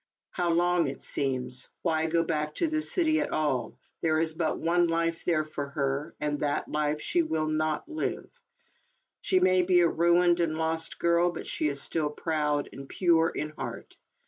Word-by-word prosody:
How 175 -1 -1
long 175 -1 +2
it 135 - -5
seems. 130 -2 -1 0.2
Why 160 -2 +1
go 165 +1 +2
back 150 -2 -2
to 335 - +1
the 310 0 -1
city 315 -1 +2
at 295 - -1
all? 145 -5 -1 0.3
There 160 -1 +2
is 160 0 +1
but 160 -1 -1
one 175 +1 +2
life 165 0 -1
there 160 -3 +2
for 150 -2 -5
her, 140 +2 -2
and 150 -1 -2
that 145 -1 -1
life 150 0 -1
she 350 - +2
will 160 - -1
not 155 - -1
live. 315 -1 -3 0.9
She 370 - +2
may 185 - +4
be? 180 0 +4
a 170 - +5
ruined 175 +1 +3
and 165 -2 0
lost 160 0 -1
girl, 170 +1 +2
but - - -7
she 155 - -1
is 140 -1 0
still 155 -3 -1
proud 150 -1 -1
and 135 0 -10
pure 165 -3 +3
in 150 - -4
heart. 150 - -7
160 Hz, 185 wpm, -28 LUFS, 150-175 Hz, 0.9 s, a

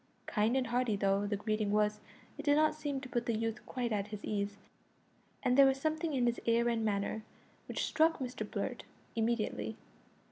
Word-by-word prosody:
Kind 220 +4 +2
and 260 - +1
hearty 240 -2 +1
though 195 0 +1
the 205 - 0
greeting 215 0 -1
was, 210 0 +2 0.4
it - - -6
did 290 -1 +4
not 310 +1 +4
seem 290 -3 -3
to 260 - -7
put 240 -1 -1
the 230 -2 +1
youth 225 +1 -2
quite 245 -3 -2
at 205 -1 0
his 210 -1 -7
ease, 200 -1 -2 0.9
and 250 - +3
there 275 0 +8
was 270 0 +2
a - - -14
something 315 +1 0
in 250 -2 +2
his 240 0 0
air 235 +1 +4
and 230 -1 0
manner 210 +1 0 0.5
which - - -1
struck 320 +1 +3
Mr 255 -2 -4
Blurt - - -3 0.3
immediately. 220 - -1
230 Hz, 200 wpm, -33 LUFS, 210-265 Hz, 0.9 s, there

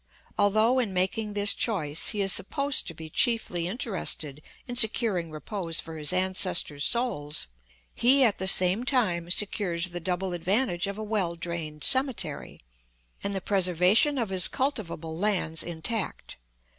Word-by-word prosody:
Although 215 +5 +2
in 210 -7 -2
making 205 +4 -1
this 205 0 +3
choice 160 -10 +1
he 210 - 0
is 195 -1 +5
supposed 280 +7 +1
to 165 - -6
be 160 0 -9
chiefly 180 -3 +1
interested 180 - 0 0.3
in 245 - -5
securing 220 -7 +4
repose 165 +2 -3
for 160 - -7
his 150 0 -1
ancestors' 185 -5 0
souls, 190 -12 -1 0.5
he 265 +3 +4
at 225 -5 +2
the 190 - -2
same 185 +4 +4
time 185 -11 0
secures 180 -2 0
the 175 0 -6
double 180 +2 -3
advantage 185 +1 -1
of 200 0 -5
a 215 - -5
well 205 -6 -2
drained 165 -3 -5
cemetery, 260 - -1 0.6
and 200 0 -2
the 190 - -2
preservation 190 - +2
of 230 -5 -1
his 190 -2 +1
cultivable 170 - -3
lands 185 -6 +1
intact. 175 +5 -4
190 Hz, 145 wpm, -27 LUFS, 170-220 Hz, 0.6 s, is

